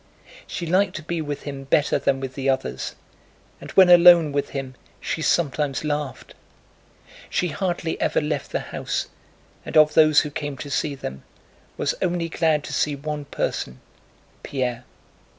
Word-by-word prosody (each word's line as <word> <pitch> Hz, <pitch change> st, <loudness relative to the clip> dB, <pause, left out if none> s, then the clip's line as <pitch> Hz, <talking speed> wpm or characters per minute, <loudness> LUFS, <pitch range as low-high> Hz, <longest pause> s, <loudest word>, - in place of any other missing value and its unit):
She 175 Hz, -, -4 dB
liked 185 Hz, +3 st, +2 dB
to 155 Hz, -, -6 dB
be 170 Hz, +1 st, -3 dB
with 145 Hz, -2 st, -5 dB
him 140 Hz, -2 st, -6 dB
better 145 Hz, +2 st, +2 dB
than 135 Hz, -, +1 dB
with 135 Hz, -1 st, -5 dB
the 135 Hz, 0 st, -2 dB
others, 130 Hz, -, -2 dB, 0.6 s
and -, -, -10 dB
when 190 Hz, -1 st, +7 dB
alone 175 Hz, -3 st, +8 dB
with 140 Hz, 0 st, -1 dB
him 135 Hz, -2 st, -5 dB, 0.3 s
she 160 Hz, -, -3 dB
sometimes 150 Hz, -4 st, 0 dB
laughed. 150 Hz, -3 st, -4 dB, 1.0 s
She 180 Hz, -, 0 dB
hardly 170 Hz, 0 st, -2 dB
ever -, -, +2 dB
left 150 Hz, -2 st, -3 dB
the -, -, -1 dB
house -, -, -2 dB, 0.5 s
and -, -, -1 dB
of 155 Hz, 0 st, +6 dB
those 155 Hz, -1 st, +6 dB
who 150 Hz, -, -5 dB
came 145 Hz, -1 st, -4 dB
to 145 Hz, +2 st, -7 dB
see 140 Hz, +1 st, -1 dB
them 65 Hz, -, -7 dB, 0.6 s
was -, -, 0 dB, 0.4 s
glad 160 Hz, -3 st, +1 dB
to -, -, -7 dB
see 150 Hz, -1 st, +1 dB
only 140 Hz, -, -15 dB
one 150 Hz, -1 st, -3 dB
person, 65 Hz, -, -3 dB, 0.6 s
Pierre. 125 Hz, -3 st, -3 dB
150 Hz, 160 wpm, -23 LUFS, 135-160 Hz, 1.0 s, alone